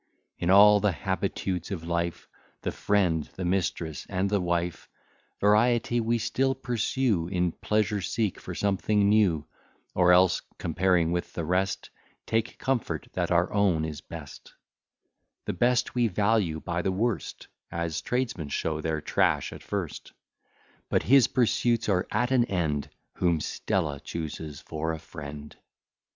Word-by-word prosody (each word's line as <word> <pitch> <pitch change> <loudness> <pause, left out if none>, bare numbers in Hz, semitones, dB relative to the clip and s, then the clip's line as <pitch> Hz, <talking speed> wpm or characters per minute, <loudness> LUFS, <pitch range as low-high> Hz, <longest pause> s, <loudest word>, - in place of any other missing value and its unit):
In 85 - -1
all 105 +2 +8
the 105 -1 +2
habitudes 95 +1 -2
of 95 -5 -4
life, 85 0 -2 0.4
The - - -1
friend, 90 -7 +1
the 95 - -4
mistress, 85 -4 -1
and 100 +1 -1
the 100 -2 +2
wife, 85 -1 -2 0.5
Variety 120 +3 +3
we 115 +1 +1
still 135 +4 0
pursue, 120 -6 0
In 90 -1 0
pleasure 105 +2 0
seek 105 +2 -1
for - - -7
something 100 +1 +1
new; 100 -8 +3 0.5
Or 90 -1 +4
else, 90 0 +5 0.2
comparing 85 -1 +1
with 85 0 -2
the 85 - -3
rest, 95 +3 -1 0.3
Take 115 +1 -1
comfort 130 -4 -2
that - - -1
our - - +2
own 95 -6 +2
is 75 -2 -6
best; - - -11 0.9
The - - -2
best 120 +7 +2
we 120 -2 +2
value 100 -5 +1
by 85 0 -2
the 95 - 0
worst, 110 +4 -2 0.3
As 85 -2 -2
tradesmen 120 - -2
show 80 +2 -2
their 80 -1 -1
trash - - +1
at - - -10
first; - - -5 0.8
But - - +2
his 135 0 +6
pursuits 120 -2 +1
are 95 -3 +1
at 120 +4 0
an 125 -3 +4
end, 80 -8 -1 0.3
Whom 85 -3 +2
Stella 75 -2 -2
chooses 75 -1 -6
for 80 +1 -3
a - - -4
friend. 75 -1 -9
95 Hz, 145 wpm, -27 LUFS, 85-110 Hz, 0.9 s, all